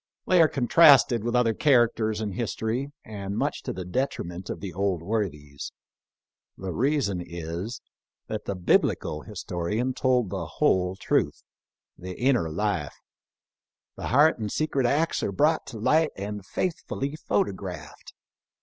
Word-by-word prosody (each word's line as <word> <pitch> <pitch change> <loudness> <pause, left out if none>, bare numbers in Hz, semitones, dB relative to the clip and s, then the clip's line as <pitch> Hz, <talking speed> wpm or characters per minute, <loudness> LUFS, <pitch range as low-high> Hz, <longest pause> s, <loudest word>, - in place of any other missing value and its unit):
They 180 -2 +5
are 160 - +7
contrasted 135 -3 +5
with 120 +1 -1
other 120 -2 +3
characters 115 -5 +2
in 105 -2 -2
history, 115 +5 -2
and 100 -1 -5
much - - -1
to - - -4
the 95 - -6
detriment 90 -5 -3
of - - -4
the 95 -4 -6
old 95 -2 -1
worthies. 75 -9 -3 0.9
The 95 -1 -5
reason 130 - +1
is, 85 +6 -6 0.4
that - - -5
the 100 - -2
Biblical 85 -3 +1
historian 105 +4 -3
told 125 -6 +1
the 95 -4 -3
whole 95 -11 +2
truth 95 - 0 0.3
— - - -59
the 90 0 -7
inner 125 -10 +2
life. 90 -3 -2 1.0
The - - -5
heart 145 +2 +4
and 105 -2 -3
secret 140 -5 0
acts 155 +6 +1
are - - -1
brought 155 - +2
to 120 - -7
light 155 +8 +3
and 100 +1 -5
faithfully 150 - -3
photographed. 100 - -3
105 Hz, 140 wpm, -26 LUFS, 95-130 Hz, 1.0 s, are